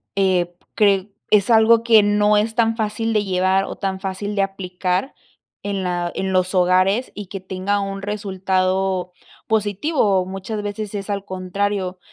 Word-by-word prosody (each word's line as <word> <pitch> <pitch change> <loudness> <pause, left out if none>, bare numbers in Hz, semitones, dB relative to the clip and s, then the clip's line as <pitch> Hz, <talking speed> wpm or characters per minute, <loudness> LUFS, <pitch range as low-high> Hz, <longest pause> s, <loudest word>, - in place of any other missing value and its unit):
eh, 185 -3 +1 0.2
cre 200 -2 +2 0.2
es 205 +1 +4
algo 225 0 +5
que 225 -2 +6
no 210 0 +3
es 220 +1 0
tan 225 -1 +2
fácil 225 +1 -1
de 210 -1 +2
llevar 190 +1 +2
o - - -6
tan 190 -1 -3
fácil 195 +2 -4
de 200 - +2
aplicar 185 +3 -2 0.5
en 200 -1 -2
la, 175 -1 -1
en 190 0 -2
los 185 0 +1
hogares 185 +6 +3
y 205 - -7
que 195 - -6
tenga 190 +2 -2
un 195 0 -4
resultado 190 -2 -1 0.4
positivo. 210 - +1
O - - -4
muchas 195 +3 -5
veces 205 0 -5
es 200 0 -5
al 200 -1 -3
contrario, 185 0 -2
195 Hz, 165 wpm, -21 LUFS, 185-210 Hz, 0.5 s, que